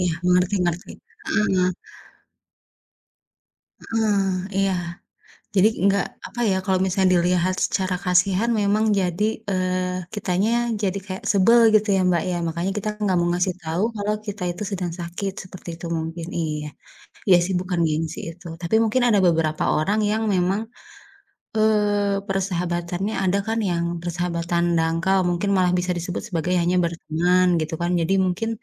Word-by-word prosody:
Iya, 180 -2 +1
mengerti 180 +2 +3
mengerti, 175 0 -2 0.4
heeh. 190 -4 +2 2.2
Heeh, 220 -3 +1 0.4
iya. 195 0 +2 0.8
Jadi, 195 +2 +6 0.2
enggak, 200 -1 +3 0.2
apa 240 - -9
ya, 190 - +2
kalau 190 -1 +1
misalnya 190 0 +2
dilihat 180 +1 +2
secara 185 -1 -1
kasihan 185 +4 +2
memang 205 +2 +2
jadi, 180 +1 -1 0.3
eee, 185 -1 -1
kitanya 200 +1 0 0.3
jadi 200 -1 0
kayak 190 -1 -6
sebel, 220 +4 +5 0.2
gitu 215 0 +3
ya, - - +2
Mbak, 170 -2 +2
ya, 180 - -1
makanya 170 +3 -2
kita 210 +1 -2
enggak 200 -3 +1
mau 170 - +1
ngasih 180 +1 0
tahu 165 +4 -2
kalau 205 0 -1
kita 205 -1 -6
itu 175 +4 -6
sedang 180 -3 -2
sakit, 175 +3 -4
seperti 185 -1 -10
itu 170 - -9
mungkin, 165 +1 -5
iya. 150 -2 -3 0.6
Iya, 190 -3 +7
sih, 190 - -2
bukan 180 -1 -2
gengsi 160 +1 -2
itu. 175 +2 -14
Tapi 170 +3 -2
mungkin 225 +3 +1
ada 210 -3 +4
beberapa 160 -2 +1
orang 195 +8 +1
yang 220 +1 0
memang, 185 +3 +1 1.0
eee, 205 -2 +2
persahabatannya 180 0 -2
ada 190 +1 +2
kan 225 +1 0
yang 170 -1 0 0.2
persahabatan 170 0 -1
dangkal, 165 +4 +1
mungkin 175 +3 -1
malah 180 -1 +3
bisa 180 +1 -3
disebut 175 +1 -4
sebagai 175 0 -1
hanya 175 +2 +1
berteman, 170 +2 +1 0.2
gitu 155 +1 -4
kan. 175 +1 0
Jadi, 165 +3 +1
mungkin 185 +5 -1
180 Hz, 150 wpm, -23 LUFS, 175-200 Hz, 2.2 s, Iya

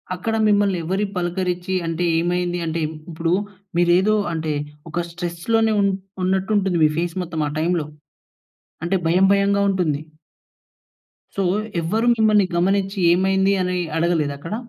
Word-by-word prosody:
అక్కడ 225 +5 -2
మిమ్మల్ని 205 -2 +3
ఎవరి 190 +5 -1
పలకరించి 180 +1 -2
అంటే 165 +1 -2 0.2
ఏమైంది? 175 +1 -1
అంటే 165 0 -2 0.3
ఇప్పుడు 165 +1 -1 0.4
మీరు 175 0 +4
ఏదో 215 +3 +2 0.2
అంటే, 160 -1 -2 0.4
ఒక 170 +2 -2
స్ట్రెస్‌ 170 0 -6
లోనే 225 -1 +3
ఉన్ 200 0 +3 0.3
ఉన్నట్టు 190 +3 0
ఉంటుంది, 190 -3 +1
మీ - - +4
ఫేస్ 170 -1 -2
మొత్తం 165 -2 -4
ఆ - - -2
టైమ్‌లో. 165 -1 0 1.0
అంటే 185 +3 0
భయం 185 +4 +4
భయంగా 200 0 +2
ఉంటుంది. 170 -7 0 1.4
సో, 195 - +1 0.4
ఎవ్వరు 215 +8 0
మిమ్మల్ని 215 -3 +4
గమనించి 195 +3 +1
ఏమైంది, 190 +2 +2
అని 180 0 -1 0.2
అడగలేదా 160 -4 +1
అక్కడ? 165 +8 -6
180 Hz, 140 wpm, -21 LUFS, 170-195 Hz, 1.4 s, మీరు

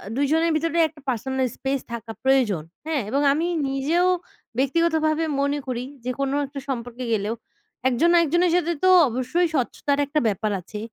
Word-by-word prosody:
২ 275 - 0
জনের 325 +1 +3
ভিতরে 330 +2 0
একটা 310 -2 -17
পার্সোনাল 260 +2 -1
স্পেস 270 0 -1
থাকা 225 -1 -6
প্রয়োজন, 250 - +2 0.2
হ্যাঁ, 310 -4 0
এবং 275 +5 +1
আমি 330 +4 0 0.2
নিজেও 305 +7 +1 0.5
ব্যক্তিগতভাবে 315 +3 +2 0.2
মনে 280 +1 +1
করি 250 -1 -2 0.2
যে, - - -1
কোনো 275 0 0
একটা 275 +1 -7
সম্পর্কে 245 0 -4
গেলেও 215 +1 -1 0.5
একজন 260 +7 +3
না - - +6
একজনের 345 +3 +2
সাথে 345 -1 +1
তো 370 - +6 0.2
অবশ্যই 260 +9 0
স্বচ্ছতার 280 +1 0
একটা 300 +2 0
ব্যাপার 210 +1 -1
আছে, 210 +4 -8
275 Hz, 165 wpm, -23 LUFS, 245-320 Hz, 0.5 s, না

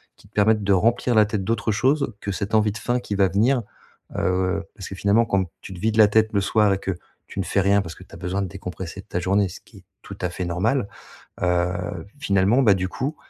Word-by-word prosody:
qui - - -21
te - - -30
permette 105 0 +3
de 100 0 +3
remplir 115 +5 +2
la 110 -1 +6
tête 105 -2 -2
d'autres 115 +2 0
choses 130 +4 +1
que 100 - -3
cette 100 +3 -2
envie 105 -1 +3
de 105 - -7
faim 120 +1 0
qui 105 - -4
va 100 -1 +4
venir, 115 +7 +2 0.5
heu. 95 +1 0
Parce 95 - -8
que, - - -6
finalement, 100 +5 +3
quand 100 -3 +1 0.2
tu 95 - -9
te 90 - -9
vides 110 +3 0
la 110 -1 +8
tête 110 +1 +3
le 100 - +3
soir 105 +1 +3
et - - 0
que 95 - -3 0.4
tu - - -7
ne 95 - +1
fais 100 - 0
rien, 100 +1 +3
parce 85 -3 -8
que - - -13
tu - - -20
as - - -8
besoin 95 +3 -2
de - - -3
décompresser 95 -1 -7
de - - -24
ta 90 - -2
journée 95 +2 +1
ce - - -10
qui - - -19
est - - -21 0.2
tout - - -9
à 90 - 0
fait 90 +1 -4
normal, 100 +7 0 0.6
heu, 90 +1 -1
finalement, 100 +3 +3
bah, 105 -5 +6
du 95 -1 -1
coup, 140 - -3
100 Hz, 255 wpm, -23 LUFS, 95-110 Hz, 0.6 s, la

